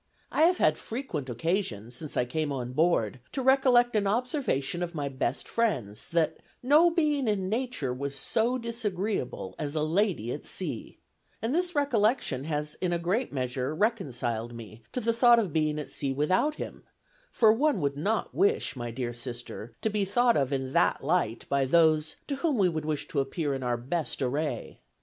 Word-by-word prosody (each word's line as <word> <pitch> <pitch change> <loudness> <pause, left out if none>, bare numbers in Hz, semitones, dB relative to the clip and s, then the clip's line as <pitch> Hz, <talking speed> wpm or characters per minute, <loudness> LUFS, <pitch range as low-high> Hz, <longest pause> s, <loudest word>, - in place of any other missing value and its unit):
I 315 - +4
have 360 +2 +3
had - - +3
frequent 220 - -5
occasion, 120 - -2
since 145 +4 -7
I 125 - +2
came 150 +4 -2
on 125 -2 -4
board, 130 - +2
to 265 - -2
recollect 250 -3 +4
an 205 -2 +2
observation 220 - -1
of 175 -1 -3
my 145 -2 -2
best 130 -1 -2
friend's, 125 - -1
'that 160 -2 +1 0.3
no 300 +7 +6
being 300 -6 +1
in 195 -3 0
nature 225 - -1
was 140 +2 -4
so 225 - +1
disagreeable 210 - -3
as 145 0 -3
a 155 - +1
lady 165 - +1
at - - -5
sea,' - - -4 0.4
and 225 +5 -2
this 355 +1 0
recollection 225 - +1
has 150 -1 -2
in 180 -2 0
a 175 - +1
great 185 +9 -1
measure 130 +1 -2
reconciled 125 - -1
me 115 -1 -10
to 250 - -2
the 230 +1 +1
thought 235 0 +6
of 200 -9 0
being 155 -1 +1
at 150 - -5
sea 135 -2 -1
without 185 - +1
him; - - -7 0.5
for 220 -2 +5
one 280 -1 +2
would 140 -3 0
not 205 +9 -1
wish, 405 - +2
my 120 -2 -4
dear 120 0 -4
sister, 120 -1 -5
to 220 - +2
be 210 -1 +1
thought 235 +5 +3
of 135 -1 +1
in 135 -1 -2
that - - +2
light 140 -7 0
by 140 -1 +2
those, 155 +1 +3
to 280 - -3
whom 300 -3 0
we 195 -3 +4
would 160 -3 -2
wish 155 -2 -2
to 145 - -1
appear 140 +2 -1
in 135 - -3
our 120 -1 0
best 145 +7 -3
array. 145 +5 -2
160 Hz, 185 wpm, -28 LUFS, -, 0.5 s, no